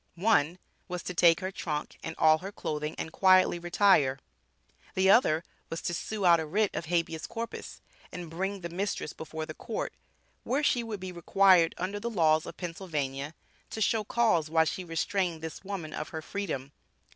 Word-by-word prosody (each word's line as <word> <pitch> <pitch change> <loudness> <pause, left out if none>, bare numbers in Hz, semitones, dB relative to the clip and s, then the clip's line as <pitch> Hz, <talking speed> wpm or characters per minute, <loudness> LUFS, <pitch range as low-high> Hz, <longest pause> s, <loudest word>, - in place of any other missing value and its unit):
One 175 -4 +2 0.3
was 180 -1 -5
to 180 - -4
take 170 0 +5
her 185 +1 -3
trunk 150 -5 -4
and 160 - -5
all 155 0 +5
her 195 +4 -7
clothing 150 -5 -4
and 160 - -4
quietly 185 -1 +4
retire." 175 -6 +3 0.8
The 190 +1 +5
other 165 -8 +4 0.3
was 165 - -3
to 175 - -1
"sue 205 +4 -3
out 170 -1 +7
a 160 - -2
writ 205 +6 +1
of - - -3
habeas 165 -1 -1
corpus; 230 0 -6 0.3
and 175 -1 -6
bring 190 +4 -3
the 170 - -5
mistress 185 -2 -3
before 160 0 -6
the 155 - -7
Court, 220 - -4 0.5
where 275 +4 0
she 250 -4 +3
would 225 -3 -5
be 185 0 -6
required, 180 0 +4
under 195 +3 -3
the 235 +3 -3
laws 160 -7 +3
of - - -8
Pennsylvania, 155 -5 -4 0.3
to - - -6
show 220 +1 +2
cause 210 -8 +2
why 160 0 +4
she 185 +3 -3
restrained 170 0 -1
this 160 +2 -6
woman 190 -6 -5
of 150 - -5
her 160 -1 -6
freedom." 155 -10 -4
175 Hz, 180 wpm, -29 LUFS, 160-195 Hz, 0.8 s, out